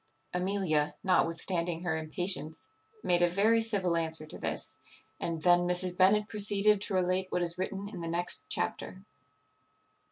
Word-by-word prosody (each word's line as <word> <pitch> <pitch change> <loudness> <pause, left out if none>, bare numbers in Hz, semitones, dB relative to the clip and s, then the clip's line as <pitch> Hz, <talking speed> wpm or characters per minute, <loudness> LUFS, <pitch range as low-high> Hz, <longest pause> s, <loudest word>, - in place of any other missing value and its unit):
Amelia, 180 -5 0
notwithstanding 170 -2 0
her 175 -3 -1
impatience, 160 0 -1 0.4
made 175 0 +1
a 175 - +4
very 215 +5 +2
civil 200 -6 +1
answer 160 -1 -1
to 155 - -9
this; - - -4 0.4
and 165 -2 -4
then 175 -1 +5
Mrs. 180 0 +3
Bennet 205 +3 +3
proceeded 210 -1 +3
to 200 - 0
relate 185 +1 0
what 180 - -1
is 170 +1 +1
written 195 +1 -4
in 195 -4 -8
the 165 - -5
next 175 +1 -1
chapter. 65 - -3
180 Hz, 150 wpm, -29 LUFS, 170-195 Hz, 0.4 s, then